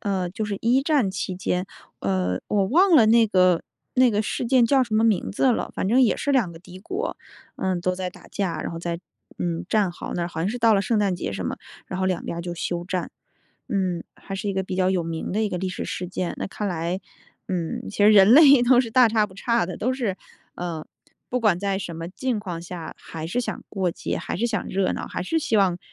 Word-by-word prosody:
呃， 190 -3 -1
就 215 +3 -3
是 205 -1 -3
一 250 +4 +3
战 280 -10 +2
期 190 -1 -3
间， 180 0 -1 0.3
呃， 90 -1 0
我 200 -2 +2
忘 350 - +4
了 230 -7 +7
那 225 0 +5
个 185 -3 +3 0.3
那 255 -1 +5
个 210 0 +1
事 220 - -2
件 250 -1 +5
叫 265 +1 +4
什 220 -2 -4
么 220 +1 +3
名 215 -5 +2
字 255 +6 +2
了， 240 - -1
反 190 - -1
正 245 +4 +4
也 235 - +3
是 285 - -1
两 220 -11 +2
个 165 - -11
敌 180 +1 -12
国， 380 - -4 0.4
呃， 185 -2 -1
都 185 +1 0
在 180 -1 -4
打 - - -16
架， 180 -6 -2
然 - - -4
后 165 - -6
在， 170 0 -4 0.4
嗯， 170 0 -2
战 205 -4 +2
壕 175 - -7
那 175 - -1
儿， 170 - -2
好 160 -1 -5
像 180 - 0
是 245 - -4
到 225 -2 +5
了 195 - +2
圣 220 +2 +1
诞 195 -3 +1
节 100 - -4
什 95 -3 -4
么， - - -3 0.3
然 185 - -5
后 190 - 0
两 185 -2 -1
边 170 - -4
儿 - - -2
就 175 0 -5
休 175 +1 -3
战。 180 -1 -3 0.6
嗯， 185 -4 0
还 195 - -8
是 200 +1 -3
一 - - 0
个 190 0 -1
比 185 - -4
较 185 0 +2
有 180 -3 +1
名 165 -1 -4
的 215 +2 +1
一 - - 0
个 180 - -3
历 185 +1 -2
史 185 - -4
事 180 -1 -4
件。 180 -1 -3
那 - - -2
看 210 +1 -4
来， 170 +1 -2 0.5
嗯， 175 -3 -3
其 205 - -9
实 205 +1 +7
人 205 +1 +7
类 280 -4 +8
都 250 0 +6
是 230 -3 -3
大 250 0 +6
差 215 -1 +2
不 - - -16
差 235 0 +1
的， 185 - -6
都 255 +4 0
是， 220 -8 -2 0.4
呃， 170 -3 -4 0.4
不 250 - 0
管 210 -6 +3
在 195 0 -1
什 175 -4 -6
么 165 +1 -6
境 235 +2 -2
况 175 -5 -5
下， 175 -1 -7
还 160 -1 -7
是 245 +7 0
想 - - -4
过 190 -3 -1
节， - - -3
还 - - -4
是 230 - -1
想 220 -5 -2
热 190 0 0
闹， - - -4
还 - - -4
是 325 - 0
希 230 -7 0
望 185 -3 +3
190 Hz, 275 characters per minute, -24 LUFS, 175-225 Hz, 0.6 s, 类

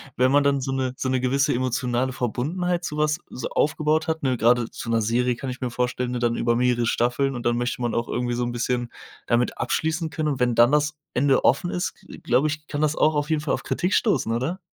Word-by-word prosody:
wenn 130 +1 +3
man 145 0 +4
dann 140 -1 +2
so 135 +1 -3
'ne 130 -1 -1
so 130 - -3
'ne 130 0 +1
gewisse 135 +3 +1
emotionale 125 0 -1
Verbundenheit 170 +9 -2
zu 150 - -4
was 150 0 +1
so 125 - -5
aufgebaut 155 +1 +1
hat, 160 -1 -2
ne? 130 -3 +1
Grade 120 0 +2
zu 115 - -7
'ner 115 -1 +2
Serie 120 +3 +1
kann 130 +2 -6
ich 125 - -6
mir 125 - -2
vorstellen, 125 +1 -2
ne? 125 - -2
Dann 120 -1 0
über 120 0 +1
mehrere 120 -1 +2
Staffeln 125 +3 +1
und 120 - -6
dann 120 0 +2
möchte 120 +1 -2
man 120 -1 -1
auch 115 0 -1
irgendwie 120 0 -2
so 120 - -1
'n 120 - -3
bisschen 120 0 -1 0.4
damit 120 +1 +1
abschließen 160 +6 -1
können 155 +1 -1
und 140 -3 -2
wenn 125 -1 +2
dann 120 +2 +5
das 150 +1 +2 0.2
Ende 135 +1 +2
offen 175 +6 +2
ist, 180 - -2
g - - -11
glaube 125 +5 +2
ich, 155 0 -4
kann 145 - -4
das 155 0 +1
auch 155 0 +3
auf 145 +1 -1
jeden 155 -2 +1
Fall 150 -3 -1
auf - - -2
Kritik 180 +3 -1
stoßen, 205 - +2
oder? 130 +10 -1
130 Hz, 250 wpm, -24 LUFS, 120-150 Hz, 0.4 s, dann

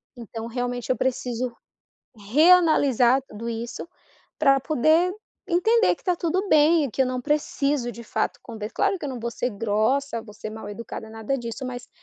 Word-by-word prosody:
então 230 -1 -7
realmente 245 0 -3
eu - - +2
preciso 250 -1 -2 0.6
reanalisar 270 - +4
tudo 225 +3 -8
isso 235 +6 -5 0.5
para 275 -3 +5
poder 315 +6 +2 0.3
entender 440 +6 +3
que - - -24
está 360 -2 +1
tudo 360 +4 -1
bem, 305 -1 +4
que 270 - 0
eu 265 - +3
não 255 0 -2
preciso 285 -2 0
de 235 +1 -10
fato, - - -2
conver 220 -2 -7
claro 395 -1 +1
que - - -5
eu - - -3
não 255 -3 -5
vou 235 +1 -3
ser 245 +1 -2
grossa 230 +5 0
vou 210 -2 -13
ser 215 0 -7
mal 220 -1 -8
educada 220 +1 -7
nada 225 +4 -3
disso, 240 +2 -5
mas 245 -1 -6
250 Hz, 175 wpm, -24 LUFS, 230-300 Hz, 0.6 s, para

